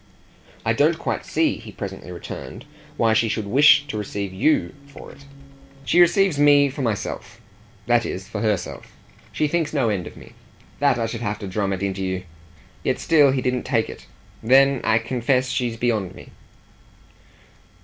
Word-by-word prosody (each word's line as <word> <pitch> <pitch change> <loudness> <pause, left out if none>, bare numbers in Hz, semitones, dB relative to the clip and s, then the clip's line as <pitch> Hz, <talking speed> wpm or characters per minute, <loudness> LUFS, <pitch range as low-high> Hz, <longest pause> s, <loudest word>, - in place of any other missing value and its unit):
"I - - +2
don't - - +2
quite - - -4
see," - - +1
he - - -11
presently - - -7
returned, 100 - -8 0.3
"why 115 -1 +3
she 110 0 +2
should 110 -1 -2
wish 145 +6 +5
to 110 -6 -5
receive 100 -2 -5
YOU 150 +12 +1
for 140 - -12
it." 140 - -17 0.6
"She 175 - +4
receives 175 -2 +3
me 145 -1 +5
for 140 - -6
myself 110 -5 -4 0.5
that 120 0 +3
is 95 -2 -5
for 100 - -5
HER 105 -3 +2
self. 90 - -10 0.4
She 150 - 0
thinks 160 0 -1
no 135 -6 +1
end 95 -4 -2
of - - -12
me. - - -13 0.5
That 140 -3 +3
I 115 - -1
should 115 0 -5
have 105 -2 -2
to 105 -2 -7
drum 100 +1 -2
it 95 0 -3
into 95 -1 -2
you!" 95 0 -3 0.6
Yet - - 0
still 150 -4 +4
he 130 -1 0
didn't 125 -1 0
take 115 -2 -1
it. - - -13 0.3
"Then 135 +2 +4
I 110 0 +3
confess 125 +2 0
she's 120 -2 -2
beyond 110 -6 -1
me." - - -13
120 Hz, 180 wpm, -22 LUFS, 105-140 Hz, 0.6 s, wish